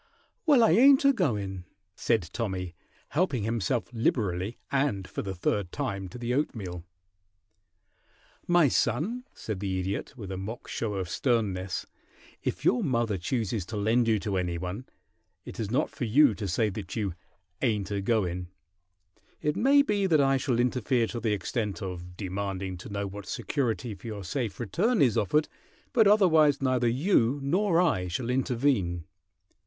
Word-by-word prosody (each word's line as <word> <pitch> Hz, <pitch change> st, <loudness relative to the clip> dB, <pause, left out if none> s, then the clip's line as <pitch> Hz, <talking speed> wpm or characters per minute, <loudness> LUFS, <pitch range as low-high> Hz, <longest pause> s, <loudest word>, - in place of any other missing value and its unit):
"Well, 280 Hz, -6 st, +6 dB
I 225 Hz, -, +5 dB
ain't 270 Hz, -, +6 dB
a 275 Hz, -, +6 dB
goin'," 105 Hz, -, -1 dB, 0.3 s
said 110 Hz, -8 st, 0 dB
Tommy, 95 Hz, -6 st, -3 dB, 0.4 s
helping 145 Hz, -, 0 dB
himself 115 Hz, +1 st, -1 dB
liberally 105 Hz, -3 st, 0 dB
and 135 Hz, -9 st, 0 dB
for -, -, -4 dB
the 95 Hz, -2 st, -5 dB
third 90 Hz, +1 st, -1 dB
time 100 Hz, -9 st, -3 dB
to 125 Hz, -, -9 dB
the 120 Hz, 0 st, -2 dB
oatmeal. 100 Hz, -, -2 dB, 1.6 s
"My 175 Hz, -3 st, +5 dB
son," 210 Hz, -, 0 dB
said 110 Hz, -4 st, -5 dB
the 95 Hz, -1 st, -2 dB
Idiot, 95 Hz, +8 st, -4 dB
with 100 Hz, -5 st, -7 dB
a 95 Hz, -, -4 dB
mock 105 Hz, +5 st, -6 dB
show 105 Hz, -3 st, -3 dB
of 95 Hz, -2 st, -2 dB
sternness, 95 Hz, -4 st, -1 dB, 0.6 s
"if 90 Hz, -, -3 dB
your 245 Hz, -, +3 dB
mother 120 Hz, -, +1 dB
chooses 110 Hz, +1 st, -1 dB
to 110 Hz, -, -5 dB
lend 115 Hz, +3 st, +2 dB
you 110 Hz, -1 st, +3 dB
to 100 Hz, -3 st, -1 dB
any 90 Hz, -2 st, -1 dB
one 90 Hz, +8 st, -5 dB, 0.6 s
it -, -, -9 dB
is 110 Hz, -3 st, -2 dB
not 130 Hz, +7 st, 0 dB
for 125 Hz, -, -4 dB
you 130 Hz, +3 st, +5 dB
to 100 Hz, 0 st, -4 dB
say 105 Hz, +4 st, +1 dB
that 95 Hz, -2 st, -6 dB
you 100 Hz, -5 st, -1 dB, 0.5 s
'ain't 105 Hz, -6 st, 0 dB
a 100 Hz, -1 st, -1 dB
goin'. 90 Hz, -5 st, 0 dB, 0.9 s
It 150 Hz, +1 st, 0 dB
may 275 Hz, +7 st, +5 dB
be 205 Hz, -6 st, +1 dB
that 160 Hz, -4 st, +4 dB
I 135 Hz, -1 st, +4 dB
shall 125 Hz, -2 st, 0 dB
interfere 125 Hz, 0 st, +1 dB
to 120 Hz, -, -5 dB
the 110 Hz, -2 st, 0 dB
extent 105 Hz, -1 st, -2 dB
of 90 Hz, -1 st, -7 dB
demanding 95 Hz, -1 st, -3 dB
to 90 Hz, -, -10 dB
know 100 Hz, 0 st, -3 dB
what 100 Hz, +1 st, -8 dB
security 120 Hz, -4 st, -2 dB
for 110 Hz, -, -11 dB
your 105 Hz, -3 st, -5 dB
safe 110 Hz, +1 st, -3 dB
return 185 Hz, -, +1 dB
is 125 Hz, -7 st, +4 dB
offered, 150 Hz, +10 st, +2 dB, 0.5 s
but 225 Hz, -4 st, +5 dB
otherwise 160 Hz, -9 st, +5 dB
neither 130 Hz, -2 st, +1 dB
you 130 Hz, -, +2 dB
nor 175 Hz, +4 st, +2 dB
I 140 Hz, -, +2 dB
shall 115 Hz, +8 st, -2 dB
intervene. 120 Hz, -, 0 dB
115 Hz, 165 wpm, -28 LUFS, 95-140 Hz, 1.6 s, Well